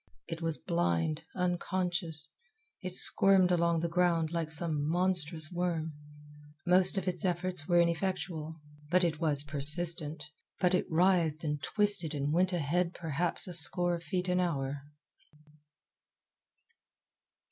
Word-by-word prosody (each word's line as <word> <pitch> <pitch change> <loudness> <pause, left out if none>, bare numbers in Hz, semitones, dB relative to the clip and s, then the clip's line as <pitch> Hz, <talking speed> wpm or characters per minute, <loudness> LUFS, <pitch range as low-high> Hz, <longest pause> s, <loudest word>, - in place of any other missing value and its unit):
It 165 0 -7
was 165 -2 -2
blind, 85 - -2
unconscious. 175 -2 -3 0.5
It 185 -1 -5
squirmed 190 -2 +3
along 170 -1 +1
the 170 - -1
ground 170 -2 0
like 165 -2 -4
some 155 -2 -1
monstrous 170 -3 -1
worm. 170 -3 -3 0.7
Most 185 +2 +5
of 190 -1 -3
its 180 +1 -1
efforts 180 -2 -3
were 175 -1 +3
ineffectual, 170 -2 -2 0.3
but 180 +2 +2
it 160 -3 -1
was 145 -3 -1
persistent, 150 +1 +3 0.4
and 180 0 +1
it 180 - 0
writhed 165 -2 +1
and 150 -2 -3
twisted 190 -2 0
and 145 +1 -2
went 185 +2 +1
ahead 175 +1 -2
perhaps 165 +2 +1
a 180 - -6
score 175 +2 +5
of 170 - -4
feet 180 +3 -4
an 180 0 0
hour. 140 -5 -3
170 Hz, 130 wpm, -30 LUFS, 155-180 Hz, 0.7 s, Most